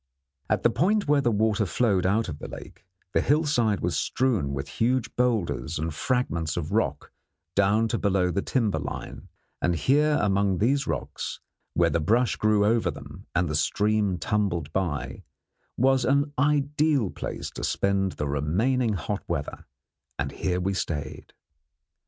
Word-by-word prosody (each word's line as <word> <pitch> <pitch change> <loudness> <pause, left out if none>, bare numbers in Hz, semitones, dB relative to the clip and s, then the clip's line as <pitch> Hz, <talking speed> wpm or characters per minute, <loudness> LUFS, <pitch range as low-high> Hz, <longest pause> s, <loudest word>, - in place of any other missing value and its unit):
At - - +1
the 120 - +4
point 185 - +1
where 145 -1 +4
the 120 - +2
water 110 -1 +1
flowed 95 -3 +1
out 110 +4 +1
of 75 -4 -6
the - - -7
lake, - - -11 0.3
the - - +3
hillside 140 -8 +2
was - - -1
strewn 115 - 0
with 70 0 -4
huge 125 +1 0
boulders 100 - 0
and 80 +1 -2
fragments 85 -6 -1
of 80 -3 -3
rock - - -1 0.4
down 100 +3 +3
to - - -1
below 95 -3 +1
the 100 - 0
timber 115 -4 0
line, - - -6 0.3
and 90 - +1
here 150 - +3
among 100 -1 +2
these 135 +6 +1
rocks, - - -4 0.4
where - - +3
the 85 - +1
brush 115 +9 +2
grew 105 -1 +2
over 115 +2 +2
them - - -9
and 90 0 +2
the 75 - -3
stream 105 +4 +1
tumbled 85 -4 -1
by, 85 -7 -2 0.6
was 130 0 +3
an 140 +3 +1
ideal 145 - +2
place - - -5
to - - -7
spend 95 -1 0
the 75 - -3
remaining 105 - +1
hot 90 -8 -3
weather; - - -4 0.5
and 70 +1 -2
here 90 -1 -1
we 95 +2 -1
stayed. 80 -5 -4
105 Hz, 160 wpm, -26 LUFS, 90-125 Hz, 0.6 s, the